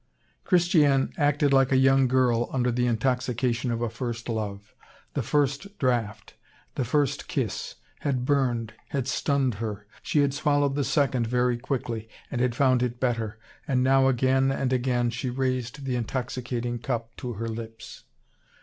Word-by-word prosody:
Christiane 160 -7 +3
acted 145 -1 +2
like 135 -1 +4
a 130 - +5
young 135 0 +5
girl 125 -2 +2
under 125 -2 +1
the 125 +1 +1
intoxication 125 0 0
of 115 0 -1
a 120 - 0
first 120 -1 -5
love. 105 -2 -4 0.4
The - - -1
first 145 +8 -1
draught, 115 -5 -1 0.4
the - - -1
first 140 +3 0
kiss, - - -3 0.2
had 130 -3 -1
burned, 125 -5 +1 0.2
had 135 -3 -2
stunned 135 -1 +1
her. 105 -2 -4 0.2
She 150 - +1
had 140 -1 +2
swallowed 145 -1 +1
the 145 0 0
second 130 -5 +1
very 125 +1 +2
quickly, 120 -4 -3 0.2
and 125 - -1
had 125 -2 +1
found 130 -2 +3
it 120 -1 -2
better, 115 -4 -1 0.3
and 130 -2 +2
now 135 0 +4
again 130 +1 +3
and 135 -1 -1
again 120 -1 +1
she 120 +2 -3
raised 130 +1 -2
the 130 -2 -1
intoxicating 120 0 -3
cup 115 -1 -3
to 125 -1 -5
her 115 +2 -4
lips. 115 -1 -8
125 Hz, 160 wpm, -26 LUFS, 120-135 Hz, 0.4 s, a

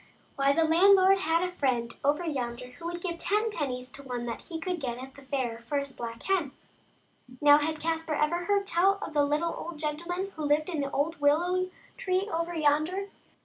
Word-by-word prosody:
Why, 275 0 +3
the 325 +3 +3
landlord 380 +4 +6
had 330 -1 +1
a 360 - -1
friend 250 -8 -1
over 295 +5 +2
yonder 250 -5 -3
who 335 +6 -13
would 345 0 -4
give 340 -2 -3
ten 425 +3 +1
pennies 255 -8 -4
to 280 - -10
one 245 -3 -4
that 235 - -4
he 330 -2 -5
could 355 0 -3
get 240 -3 -3
at 260 +1 -9
the 280 - -14
fair 260 -4 -2
for 235 +5 -3
his 280 -1 -3
black 230 -1 -7
hen. 355 -8 0 0.9
Now, 290 0 +7
had 310 +1 -2
Caspar 325 -1 -1
ever 340 +4 0
heard 400 0 +2
tell 390 +2 +3
of - - -6
the 295 -1 +3
little 300 +4 0
old 340 -2 -7
gentleman 340 +6 -3
who 310 - -5
lived 300 +3 +2
in 320 -5 -1
the 280 - -2
old 295 +3 -1
willow 355 +6 +2 0.3
tree 375 +1 0
over 335 +1 -1
yonder? 315 +6 +1
310 Hz, 205 wpm, -29 LUFS, 280-350 Hz, 0.9 s, Now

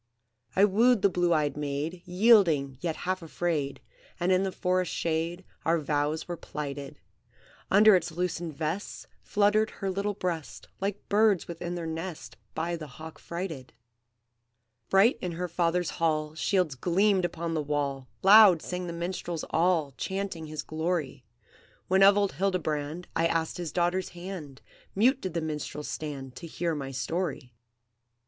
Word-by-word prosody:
"I 195 - +6
wooed 225 +2 +3
the 200 - +6
blue 175 -1 +1
eyed 150 -4 +2
maid, 150 +4 -3
Yielding, 180 - +4
yet 165 -2 -1
half 185 0 -1
afraid, 155 -4 -2 0.4
And 175 +2 +1
in 185 0 +4
the 195 -1 -1
forest's 180 0 0
shade 170 +2 -2 0.2
Our 165 +2 +2
vows 150 0 -1
were 175 - -3
plighted. 145 -3 -6 0.7
Under 210 +1 +7
its 180 - 0
loosened 170 -2 -3
vest 160 +7 -4 0.2
Fluttered 210 +1 +2
her 195 -1 -4
little 200 +2 -2
breast, 175 -6 -4
Like 200 +1 -3
birds 205 -3 +3
within 175 +1 -5
their 170 -1 -4
nest 165 +1 -6 0.2
By 170 +2 -1
the 155 -2 -7
hawk 155 +4 -11
frighted. 170 -7 -6 1.2
"Bright 195 +6 +4
in 180 -2 -3
her 180 +2 -3
father's 170 0 0
hall 155 -2 0
Shields 180 -1 +1
gleamed 185 +7 +2
upon 170 -1 -2
the 155 - 0
wall, 140 -3 -2 0.2
Loud 195 -4 +8
sang 180 0 -4
the 170 - -4
minstrels 170 -1 -4
all, 165 -3 +2
Chanting 190 -4 -3
his 155 0 -5
glory; 160 -5 -2 0.6
When 190 +1 +4
of 200 +1 +7
old 200 -1 +2
Hildebrand 160 -2 -2
I 165 0 +3
asked 165 -1 -1
his 175 -4 -4
daughter's 180 +2 0
hand, 175 -6 -8 0.3
Mute 250 +7 +3
did 185 -3 -5
the 170 - 0
minstrels 150 -2 -4
stand 135 -3 -6
To 170 - -8
hear 165 +1 -2
my 140 -3 -4
story. 135 -1 -3
170 Hz, 155 wpm, -28 LUFS, 155-185 Hz, 1.2 s, Loud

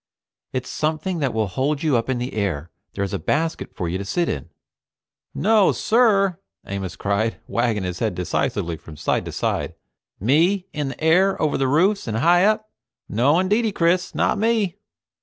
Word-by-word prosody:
"It's 130 -1 -3
something 155 +3 -1
that 140 -4 0
will 110 -1 0
hold 140 - -1
you 155 -4 +2
up 115 +1 0
in 130 - 0
the 125 +2 -4
air. 85 -7 -2 0.2
There's 100 -1 -2
a - - -1
basket 160 - -2
for 85 - -3
you 90 +3 -2
to - - -3
sit 170 - 0
in - - -4 0.5
" - - -64 0.2
"No 215 -4 +5
sir!" 200 -6 +3 0.3
Amos 95 -2 -5
cried, 100 +3 -1
wagging 115 -4 0
his 90 -1 -4
head 110 -5 -1
decisively 85 -1 -1
from 80 -1 -12
side - - 0
to - - -5
side. - - -2 0.4
"Me 170 - +2
in 150 -2 -2
the 135 +3 -7
air 185 +5 +4
over 155 - +1
the 135 -1 +1
roofs 185 +8 +2
and 110 -1 -1
high 175 +8 +4
up? 215 0 +1 0.4
No 130 +9 +3
indeedy, 210 +5 +2
Chris! 180 +1 +1
Not - - +1
me." 220 -4 +1
145 Hz, 180 wpm, -22 LUFS, -, 0.5 s, No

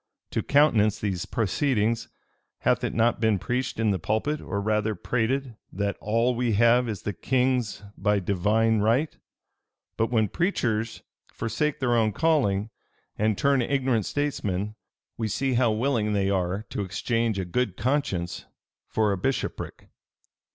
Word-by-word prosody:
To - - 0
countenance 115 -8 +3
these 95 -4 -3
proceedings, 115 0 0 0.5
hath - - +2
it - - -2
not 115 +1 +2
been 110 -3 +3
preached 125 +7 -2
in 110 -2 +2
the 95 - -1
pulpit, 110 - -1
or 100 - -3
rather 105 +1 0
prated, 125 +4 -1
that 100 +1 -2
'All 115 +4 +1
we 120 -1 0
have 120 +3 +4
is 105 -5 -5
the 105 - -2
king's 125 -1 0
by 105 0 +1
divine 105 +4 +2
right'? 120 +9 +1 0.8
But 115 - +1
when 110 -3 +2
preachers 115 - -1 0.3
forsake 125 +7 -2
their 120 -2 +2
own 110 -2 +2
calling, 110 -9 +1 0.4
and 105 -1 +1
turn 140 -2 +3
ignorant 130 -4 0
statesmen, 105 -9 -2 0.4
we 110 -1 -1
see 130 +5 0
how 120 -2 +3
willing 110 -2 0
they 100 -1 +1
are 95 +1 -1
to - - -2
exchange 110 +4 -1
a 95 - -2
good 100 +1 -1
conscience 115 -8 -1 0.4
for 110 -2 +1
a 100 - 0
bishopric. 135 +7 -3
110 Hz, 145 wpm, -26 LUFS, 105-125 Hz, 0.8 s, have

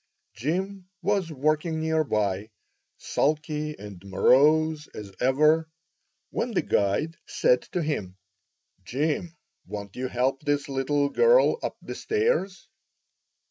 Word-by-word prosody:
Jim 185 - -3
was 195 -3 0
working 155 +3 0
near 160 0 +1
by, 105 -5 -1 0.5
sulky 150 0 -1
and 100 -3 -10
morose 150 - +3
as 100 -2 -8
ever, 155 +5 +3 0.6
when - - -2
the - - +3
guide 145 +12 0
said 125 0 +3
to 175 - -3
him: 100 -12 -3 0.7
"Jim, 155 - -2 0.3
won't 100 -1 -7
you 130 +1 -2
help 130 +2 0
this 145 0 0
little 140 +1 +1
girl 475 - +4
up - - -4
the - - -6
stairs?" 430 - -1
150 Hz, 115 wpm, -26 LUFS, 125-160 Hz, 0.7 s, girl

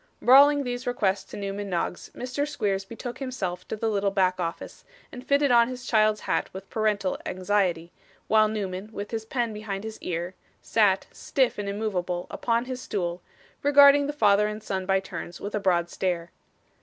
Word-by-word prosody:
Bawling 285 +3 +6
these 245 -1 -4
requests 205 -6 0
to - - -10
Newman 200 0 -4
Noggs, 175 0 -3
Mr. 255 +4 -3
Squeers 200 -8 -1
betook 235 +3 -7
himself 195 -10 -4
to - - -3
the 225 +1 -2
little 205 -2 +1
back 185 -2 +1
office, 170 -1 -5 0.3
and 250 - -9
fitted 280 0 +2
on 235 -1 +6
his 250 0 -7
child's 215 -1 +3
hat - - -1
with 190 +1 -8
parental 210 -4 0
anxiety, 185 -3 0 0.4
while 215 0 +5
Newman, 200 -2 -4
with 205 -1 -6
his 220 -1 -3
pen 235 -1 -2
behind 210 -2 -5
his 220 0 -7
ear, 175 +1 -3 0.3
sat, 200 -4 +2
stiff 260 -5 0
and 200 -1 -3
immovable, 185 -4 -2 0.2
on 235 +1 +2
his 255 0 -5
stool, 175 -6 -3 0.4
regarding 285 0 +6
the - - -1
father 210 -6 +3
and 210 0 -6
son 190 -3 -3
by 195 0 +3
turns 185 -2 -7
with 205 - -6
a 210 - 0
broad 175 -3 +2
stare. 175 -1 -2
210 Hz, 180 wpm, -26 LUFS, 190-240 Hz, 0.4 s, Bawling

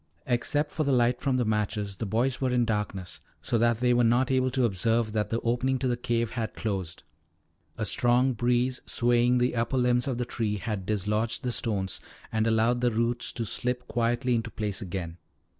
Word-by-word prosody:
Except 145 +4 0
for 155 - -1
the 140 - +1
light 120 -1 +2
from 135 -2 +1
the 125 - +1
matches, 105 -2 -1
the 110 - -3
boys 120 +6 0
were 130 - +1
in 125 -1 +2
darkness, 100 -5 -3 0.2
so 115 - -1
that 120 0 +2
they 125 -1 +4
were 120 0 +3
not 120 +3 +3
able 130 0 +2
to 130 -1 +1
observe 115 +2 +1
that 105 -1 -1
the 115 - 0
opening 125 +3 +1
to 130 - -1
the 120 - +1
cave 120 -1 -1
had 115 -3 -4
closed. 95 -6 -3 0.7
A - - -1
strong 125 +2 +3
breeze, 125 +2 +1
swaying 120 +1 +3
the 125 0 +1
upper 115 +3 0
limbs 125 0 +2
of 130 -3 -1
the 125 - -1
tree, 105 -3 -2
had 100 -1 -4
dislodged 105 +4 -1
the 125 - -1
stones 95 -6 -1 0.3
and 110 0 +1
allowed 115 +2 +2
the 125 - +3
roots 115 +1 0
to 115 - -3
slip 125 +3 -2
quietly 120 +1 0
into 115 -1 -1
place 105 -2 -4
again. 90 -3 -5
120 Hz, 200 wpm, -27 LUFS, 110-125 Hz, 0.7 s, they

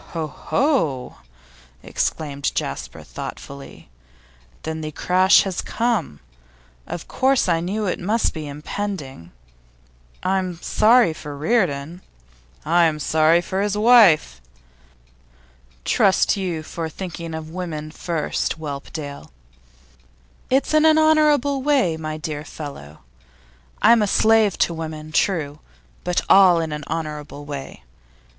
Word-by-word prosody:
'Ho, 165 -2 -2
ho!' 155 - -1 0.7
exclaimed 140 -3 -2
Jasper, - - -4
thoughtfully. 140 0 -9 0.8
'Then 160 0 -4
the 155 0 -5
crash 185 +5 +4
has 190 -3 -3
come. 230 - -2 0.7
Of 170 - -6
course 265 -3 +2
I 170 -2 +2
knew 200 +5 -2
it 180 - -2
must 215 +5 0
be 155 -2 -6
impending. 145 - -6 0.9
I'm 185 -2 -1
sorry 225 -3 +4
for 145 -2 -8
Reardon.' 165 -3 -1 0.6
'I'm 165 -1 +3
sorry 160 +3 +3
for 190 +2 -3
his 205 0 -1
wife.' 210 - +5 1.4
'Trust 195 -2 +3
you 180 -5 -3
for 165 0 -5
thinking 170 -2 -7
of 160 0 -7
women 160 -4 -5
first, 165 -1 -2
Whelpdale.' 145 - -7 1.2
'It's 270 +4 +1
in 310 0 +5
an 315 0 +5
honourable 300 -3 +3
way, 260 - +2
my 155 -1 -5
dear 150 -1 -5
fellow. 140 - -9 0.8
I'm 230 -1 +6
a 210 - +2
slave 220 -1 +3
to 170 - -6
women, 155 -1 -7
true, 155 -4 0 0.4
but 180 0 0
all 185 -3 +6
in 160 -1 -3
an 150 -1 -5
honourable 150 -2 -5
way. 140 - -8
165 Hz, 115 wpm, -21 LUFS, 150-205 Hz, 1.4 s, I'm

